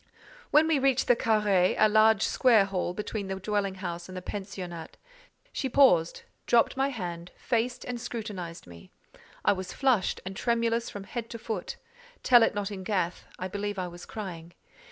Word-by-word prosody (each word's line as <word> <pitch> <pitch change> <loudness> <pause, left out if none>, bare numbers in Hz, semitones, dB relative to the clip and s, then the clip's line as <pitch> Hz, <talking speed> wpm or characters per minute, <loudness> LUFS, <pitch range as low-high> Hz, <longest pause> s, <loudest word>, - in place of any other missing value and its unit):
When 305 +2 +5
we 315 -3 +2
reached 265 -1 +2
the 245 - +6
carré, 210 -5 +2
a 215 - +6
large 215 0 +4
square 230 -6 +4
hall 190 -2 -2
between 210 0 -4
the 190 - -3
dwelling 195 0 -2
house 175 -2 -6
and 185 - -7
the - - -5
pensionnat, 185 -5 -7 0.6
she 265 - -2
paused, 180 -12 +4 0.2
dropped 235 +2 +4
my 270 +1 +1
hand, 175 -8 -6
faced, 245 +1 -1
and 245 -1 -5
scrutinized 205 -8 -6
me. 85 -1 -14 0.6
I - - +5
was 185 -1 -6
flushed, 255 -8 +1
and 190 +1 -6
tremulous 235 +1 0
from 205 - -7
head 230 +3 -6
to 230 - -6
foot: 220 -4 -5 0.5
tell 240 -2 +7
it 225 - +3
not 205 0 -2
in 190 -2 -6
Gath, 185 -3 -2
I 185 - -4
believe 205 +2 -4
I 185 -1 -2
was 175 +1 -11
crying. 175 -5 -7
205 Hz, 175 wpm, -28 LUFS, 185-235 Hz, 0.6 s, tell